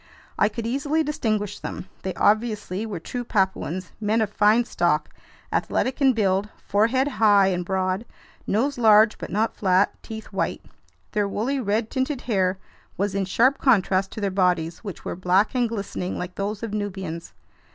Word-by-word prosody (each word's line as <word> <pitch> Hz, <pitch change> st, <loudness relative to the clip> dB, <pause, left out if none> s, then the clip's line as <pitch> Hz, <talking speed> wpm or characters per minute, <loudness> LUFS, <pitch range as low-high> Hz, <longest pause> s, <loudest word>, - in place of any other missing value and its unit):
I 210 Hz, -, +4 dB
could 225 Hz, +1 st, -5 dB
easily 285 Hz, +6 st, 0 dB
distinguish 215 Hz, -8 st, -2 dB
them. -, -, -6 dB, 0.2 s
They 190 Hz, -, -4 dB
obviously 215 Hz, -2 st, +1 dB
were 205 Hz, -6 st, -4 dB
true 245 Hz, +9 st, -5 dB
Papuans, 190 Hz, -4 st, -1 dB
men 215 Hz, +2 st, +1 dB
of 215 Hz, -2 st, 0 dB
fine 215 Hz, +3 st, +4 dB
stock, 175 Hz, -7 st, 0 dB, 0.4 s
athletic 260 Hz, +2 st, 0 dB
in 265 Hz, -2 st, +5 dB
build, 200 Hz, -2 st, +1 dB
forehead 230 Hz, +7 st, +1 dB
high 205 Hz, -7 st, +4 dB
and 180 Hz, -1 st, -1 dB
broad, 190 Hz, +3 st, -1 dB, 0.4 s
nose 255 Hz, +6 st, 0 dB
large 220 Hz, -1 st, +5 dB
but -, -, -6 dB
not 215 Hz, +3 st, 0 dB
flat, 190 Hz, 0 st, +2 dB
teeth 220 Hz, -1 st, -8 dB
white. -, -, -2 dB, 0.5 s
Their 205 Hz, -1 st, +1 dB
woolly, 240 Hz, +8 st, -1 dB
red 220 Hz, -1 st, -1 dB
tinted 260 Hz, 0 st, -1 dB
hair 190 Hz, -5 st, 0 dB, 0.4 s
was 200 Hz, 0 st, 0 dB
in 195 Hz, -1 st, 0 dB
sharp 255 Hz, +8 st, +3 dB
contrast 195 Hz, -6 st, +3 dB
to 215 Hz, -, -6 dB
their 200 Hz, -1 st, 0 dB
bodies, 180 Hz, -3 st, +1 dB
which 200 Hz, -5 st, -8 dB
were -, -, -3 dB
black 185 Hz, +3 st, +2 dB
and 245 Hz, -2 st, +1 dB
glistening 200 Hz, -4 st, -4 dB
like 180 Hz, 0 st, -5 dB
those 205 Hz, +3 st, -4 dB
of 220 Hz, -2 st, -4 dB
Nubians. 190 Hz, -5 st, -4 dB
210 Hz, 165 wpm, -24 LUFS, 190-230 Hz, 0.5 s, in